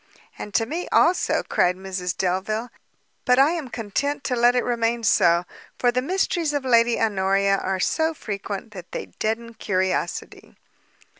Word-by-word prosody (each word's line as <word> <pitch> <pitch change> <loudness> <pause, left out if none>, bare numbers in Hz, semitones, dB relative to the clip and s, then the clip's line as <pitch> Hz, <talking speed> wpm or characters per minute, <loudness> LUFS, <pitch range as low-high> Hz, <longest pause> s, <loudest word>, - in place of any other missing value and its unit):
"And 210 - -6
to 225 - +3
me 330 +9 -4
also," 345 +3 +3
cried 180 0 +1
Mrs 185 -1 -4
Delvile, 205 +6 -1 0.5
"but 250 0 +3
I 275 +4 +5
am 325 -7 -4
content 260 +7 -3
to 250 - -1
let 240 +1 +4
it 245 - +2
remain 235 -1 0
so; 170 -4 +4 0.3
for 245 - +2
the 250 +1 0
mysteries 340 0 0
of 285 -2 -2
Lady 235 -1 +3
Honoria 195 -2 +2
are 190 0 -2
so 320 - 0
frequent, 205 -2 -6
that 180 -4 -11
they - - -4
deaden 230 +2 -2
curiosity." 190 -4 -2
230 Hz, 155 wpm, -23 LUFS, 195-255 Hz, 0.5 s, I